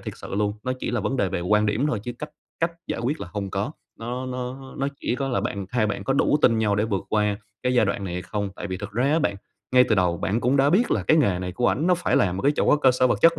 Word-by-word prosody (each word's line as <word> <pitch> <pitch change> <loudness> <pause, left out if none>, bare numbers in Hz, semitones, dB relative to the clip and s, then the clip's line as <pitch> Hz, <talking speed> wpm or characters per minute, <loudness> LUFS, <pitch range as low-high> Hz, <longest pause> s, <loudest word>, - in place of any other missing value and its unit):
thiệt - - -6
sự - - -7
luôn, 105 0 +1
nó 130 - 0
chỉ - - -2
là 120 - 0
vấn 135 +6 -1
đề 100 -6 +1
về 85 - -2
quan 105 +4 +2
điểm 110 +8 +1
thôi 115 -8 -1
chứ 120 - -4
cách 150 - -6 0.3
cách 165 +1 +1
giải - - -3
quyết 135 +7 -2
là - - -6
hông 100 -1 -3
có, 100 +11 -2 0.3
nó 125 +3 -4
nó 130 +1 -6
nó 140 - 0
chỉ - - -1
có 135 -1 -2
là 125 - 0
bạn 100 -2 -3
hai 115 -3 +1
bạn 105 - -3
có 135 - +1
đủ 145 +2 +3
tin 115 -2 +5
nhau 105 -2 +2
để 105 - +2
vượt 100 -4 -2
qua 105 -1 +1 0.3
cái 125 0 +1
giai 120 - +5
đoạn 100 0 -2
này 90 -2 -4
hay 90 - -3
không. 100 +2 -3
Tại - - -5
vì 95 -1 -4
thực 100 +1 -7
ra 120 +4 0
á 160 - +3
bạn, 100 -10 0 0.4
ngay 125 0 +7
từ 110 - +4
đầu 90 -3 +2
bạn 110 +5 0
cũng 130 +4 +2
đã 140 +2 +4
biết 225 +7 +3
là - - +1
cái 160 - +3
nghề 100 - +3
này 90 0 -4
của 120 - +1
ảnh 155 +6 0
nó 180 - +5
phải 175 0 0
làm 90 -2 +2
một - - -4
cái 145 +2 +4
chỗ - - +4
cơ 135 -3 +4
sở 130 0 +3
vật - - +1
chất 165 0 +6
120 Hz, 320 wpm, -24 LUFS, 100-135 Hz, 0.4 s, ngay